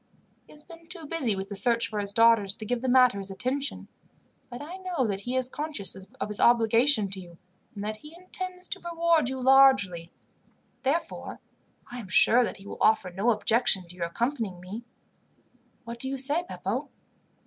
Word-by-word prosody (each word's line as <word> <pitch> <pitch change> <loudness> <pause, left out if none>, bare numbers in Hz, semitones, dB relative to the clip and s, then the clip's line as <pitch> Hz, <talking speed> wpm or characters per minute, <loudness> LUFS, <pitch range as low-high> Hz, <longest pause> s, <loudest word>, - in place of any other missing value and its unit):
He - - -18
has 300 0 -12
been 330 0 -15
too 345 -3 -5
busy 285 -9 -1
with 195 0 -6
the 200 - -5
search 235 +4 +4
for 215 - -4
his 200 -1 -1
daughters 225 -2 +4
to 220 -1 -8
give 245 +2 -2
the 260 - -1
matter 250 -5 +5
his 195 0 -5
attention, 260 +8 -3 0.6
but 245 -1 -8
I 320 +6 -8
know 365 -8 -2
that 200 -3 -2
he 245 +5 -4
is 255 -1 +1
conscious 290 -7 -3
of 195 +8 -8
his 210 0 -2
obligation 230 0 +4
to 195 - -5
you, 175 -2 -13 0.4
and 200 - -6
that 215 +1 -4
he 300 +8 -14
intends 365 0 -4
to - - -3
reward 335 -4 +1
you 265 0 -4
largely. 255 -11 +4 0.7
Therefore, 300 +5 -3 0.5
I 245 - -6
am 215 - -9
sure 240 +5 +5
that - - -4
he 195 - -15
will - - -9
offer 205 -4 +3
no 195 +7 0
objection 220 -4 +2
to 180 - -8
your 170 -2 -3
accompanying 225 -1 -3
me. 195 +6 -8 1.0
"What 235 0 -8
do 265 - -1
you 270 - -3
say, 290 +7 0
Beppo?" - - -4
240 Hz, 190 wpm, -27 LUFS, 200-285 Hz, 1.0 s, matter